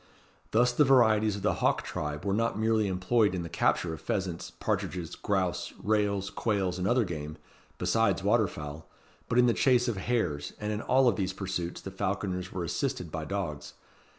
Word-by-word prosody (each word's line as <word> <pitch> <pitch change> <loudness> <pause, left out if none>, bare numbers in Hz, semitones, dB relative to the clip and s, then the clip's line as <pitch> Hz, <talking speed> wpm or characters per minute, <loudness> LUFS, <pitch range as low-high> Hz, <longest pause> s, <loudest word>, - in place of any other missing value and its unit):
Thus 120 +2 +3
the 135 +5 +4
varieties 110 -6 +4
of 100 - -7
the - - +2
hawk - - +2
tribe 75 +3 -4
were 100 - +1
not 115 +1 0
merely 110 -1 +2
employed 95 +2 +2
in 90 - -3
the 85 - -6
capture 80 +1 +1
of 80 - -8
pheasants, 90 0 -3
partridges, 85 -2 -3
grouse, 95 -4 -1
rails, 100 -2 0
quails, 95 -5 -1
and 90 - 0
other 120 0 +3
game, 75 -3 -5 0.4
besides 100 -5 +1
water 105 +1 +3
fowl, 75 -1 -8 0.4
but 115 - +1
in 125 - +6
the 120 - +4
chase 125 -1 +3
of 115 -5 -1
hares; 90 -9 -1
and 105 0 -2
in 105 - -3
all 130 +2 +3
of 120 - +3
these 95 -2 -1
pursuits 95 -3 -4
the 95 - -7
falconers 95 -1 -2
were 90 - -3
assisted 85 0 -2
by 80 -1 -4
dogs. 85 -7 -4
100 Hz, 185 wpm, -29 LUFS, 90-110 Hz, 0.4 s, in